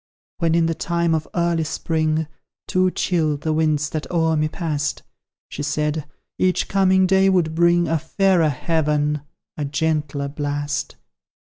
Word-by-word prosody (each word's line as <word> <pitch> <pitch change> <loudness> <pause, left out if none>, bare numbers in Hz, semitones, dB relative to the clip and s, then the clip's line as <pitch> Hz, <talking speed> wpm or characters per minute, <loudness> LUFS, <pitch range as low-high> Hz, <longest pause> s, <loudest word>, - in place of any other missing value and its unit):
"When, 165 -1 +2
in 170 -1 +3
the 165 - +1
time 170 +1 0
of 155 -1 -1
early 170 -2 +1
Spring, 160 0 -1 0.4
Too 185 0 +2
chill 160 -5 0
the 155 +2 -2
winds 155 -2 +1
that 155 -1 -4
o'er 165 -2 +1
me 155 0 +1
pass'd, 155 -3 -3 0.4
She - - -6
said, 150 +1 -1 0.3
each 185 -1 +1
coming 190 -1 +3
day 190 +1 +4
would 175 -4 +2
bring 170 +1 +3
a 165 -1 +1
fairer 175 0 +2
heaven, 150 0 0 0.4
a 150 - -2
gentler 150 -1 -1
blast. 145 0 -3
160 Hz, 145 wpm, -21 LUFS, 150-170 Hz, 0.4 s, day